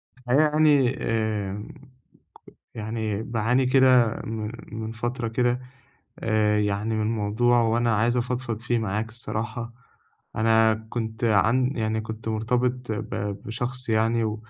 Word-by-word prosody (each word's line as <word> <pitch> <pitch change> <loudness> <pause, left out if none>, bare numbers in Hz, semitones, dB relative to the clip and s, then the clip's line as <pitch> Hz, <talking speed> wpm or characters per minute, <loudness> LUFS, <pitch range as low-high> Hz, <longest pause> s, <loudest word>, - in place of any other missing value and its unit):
في 125 - -23
الحقيقة 140 - +5
يعني، 145 -4 +4
آآ 105 -3 -1 1.1
يعني، 110 -1 -3
باعاني 120 +3 +1
كده 130 -3 +4
من 110 -1 -4 0.2
من 110 0 -5
فترة 120 +1 -3
كده 125 +2 +1 0.6
آآ 105 -1 +2
يعني 105 +2 -1
من 110 -1 0
موضوع، 115 +3 +2
وأنا 115 0 +2
عايز 115 +3 +2
أفضفض 125 -2 -2
فيه 120 0 0
معاك 110 0 -2
الصراحة. 115 +1 -5 0.6
أنا 110 0 +4 0.2
كنت 115 0 -3
عن 115 +4 +3
يعني 110 -1 0
كنت 110 +1 -7
مرتبط 125 +2 -1
ب 105 - -5 0.3
بشخص 125 +2 -4
يعني، 110 0 +1
115 Hz, 125 wpm, -25 LUFS, 110-120 Hz, 1.1 s, الحقيقة